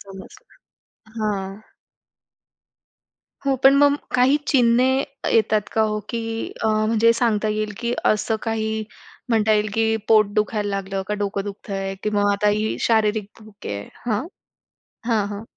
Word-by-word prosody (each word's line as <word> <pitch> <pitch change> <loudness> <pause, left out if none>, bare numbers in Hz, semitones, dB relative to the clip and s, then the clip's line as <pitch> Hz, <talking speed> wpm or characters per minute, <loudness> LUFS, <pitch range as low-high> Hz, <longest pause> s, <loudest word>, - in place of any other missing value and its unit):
समजला. 195 -1 -14 0.6
हां. 195 -3 -2 1.9
हो. 275 - +3
पण 270 +1 +8
मग 285 0 +5 0.2
काही 255 +3 +4
चिन्हे 245 -2 +4 0.5
येतात 215 -2 +2
का 220 - +2
हो, 215 -1 0
की 225 -1 -3
अ, - - +1 0.2
म्हणजे 230 +1 +4
सांगता 225 -2 +1
येईल, 215 0 -2
की 235 0 -1
असं 215 +1 +1
काही 220 -1 -2 0.4
म्हणता 220 -2 +3
येईल, 210 0 +1
की 225 0 +2
पोट 215 -2 +6
दुखायला 210 -1 0
लागलं 195 -1 -3
का 210 - 0
डोकं 200 -1 -2
दुखतंय 195 -1 -5
किंवा 210 -1 0
मग 205 - +3
आता 200 +1 +1
ही 215 +1 0
शारीरिक 220 -2 +1
भूक 215 -1 -14
आहे? 100 0 -4 0.2
हं. 220 +4 -1 0.8
हां, 220 -4 +1
हां. 205 +1 -6
215 Hz, 145 wpm, -22 LUFS, 205-225 Hz, 1.9 s, पण